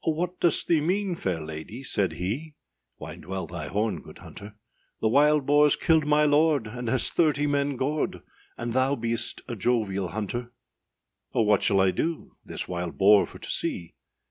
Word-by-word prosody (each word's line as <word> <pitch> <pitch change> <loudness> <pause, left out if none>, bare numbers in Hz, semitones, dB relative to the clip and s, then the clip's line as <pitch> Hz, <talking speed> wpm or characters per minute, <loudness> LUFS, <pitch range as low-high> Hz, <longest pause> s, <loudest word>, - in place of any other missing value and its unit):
âOh, 160 - 0
what 180 +2 -3
dost 170 -3 +2
thee 165 -3 +3
mean, 190 +4 0
fair 95 - -2
lady,â 80 - -8
said 95 -8 0
he, 115 - -4 0.4
Wind - - -9
well 95 +2 -4
thy 85 -3 -6
horn, 105 +7 -1
good - - -13
hunter; 100 +1 -11 0.4
âThe 110 - +1
wild 150 +1 +4
boarâs 145 +1 +4
killed 160 -2 +3
my 150 0 +4
lord, 150 -3 +3
and 120 +3 -6
has 130 +3 +2
thirty 150 -3 +2
men 140 -1 0
gored, 145 +4 -2 0.4
And 120 0 -4
thou 130 +2 +2
beest 115 -1 -3
a 120 - -4
jovial 100 -4 0
hunter.â 110 +6 -4 0.9
âOh, 110 - +3
what 105 -2 +3
shall 100 - +2
I 95 -1 +4
do 165 - -3
this - - -6
wild 90 -2 -4
boar 100 +1 +5
for - - -12
to - - -10
see? 85 -2 -3
120 Hz, 180 wpm, -26 LUFS, 100-150 Hz, 0.9 s, boar